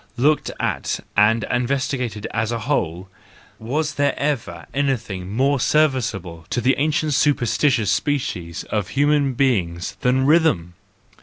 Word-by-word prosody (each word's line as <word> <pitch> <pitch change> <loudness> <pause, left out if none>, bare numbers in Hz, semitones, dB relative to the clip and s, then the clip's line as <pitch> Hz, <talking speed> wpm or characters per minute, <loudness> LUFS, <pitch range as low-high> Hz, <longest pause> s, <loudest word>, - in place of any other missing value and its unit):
—Looked 145 +5 +2
at - - -1 0.2
and 105 +2 +4
investigated 125 -3 -1
as 115 +1 -1
a 115 -1 -2
whole, 95 - -1 0.5
was 150 +7 -2
there 145 0 0
ever 115 - -2
anything 115 -10 -2
more 135 +5 +2
serviceable 115 - 0
to - - -1
the 130 +3 +3
ancient 150 0 +1
superstitious 130 -5 +2
species 95 - -2
of 105 -4 -1
human 145 -1 +2
being 100 -11 +1 0.2
than 130 +1 +2
rhythm 150 - +3
125 Hz, 125 wpm, -21 LUFS, 105-145 Hz, 0.5 s, and